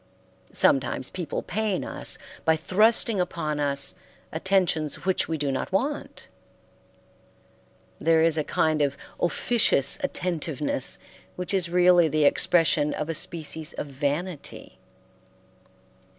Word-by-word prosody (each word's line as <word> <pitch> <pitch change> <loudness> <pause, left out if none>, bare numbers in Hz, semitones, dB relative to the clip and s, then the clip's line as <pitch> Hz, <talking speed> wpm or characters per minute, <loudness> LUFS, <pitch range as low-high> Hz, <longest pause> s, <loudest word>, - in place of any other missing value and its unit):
Sometimes 130 -1 +1
people 170 -5 -4
pain 210 0 -2
us - - -4 0.3
by 160 - +3
thrusting 210 +6 +3
upon 165 -4 -2
us 140 -1 +1 0.4
attentions 165 -3 0
which 190 -1 +1
we 160 - -2
do 145 -2 -1
not 135 - -3
want. 275 +10 -3 1.7
There 160 -1 +3
is 165 -1 +3
a 155 - 0
kind 155 +1 0
of 140 -1 0 0.2
officious 175 - +3
attentiveness 155 -6 -2 0.4
which 180 +2 -4
is 185 -3 +1
really 180 -1 +5
the 155 0 +1
expression 150 -1 +3
of 150 +1 -4
a - - -1
species 160 0 -2
of - - -5
vanity. 145 +4 -5
160 Hz, 115 wpm, -25 LUFS, 150-180 Hz, 1.7 s, really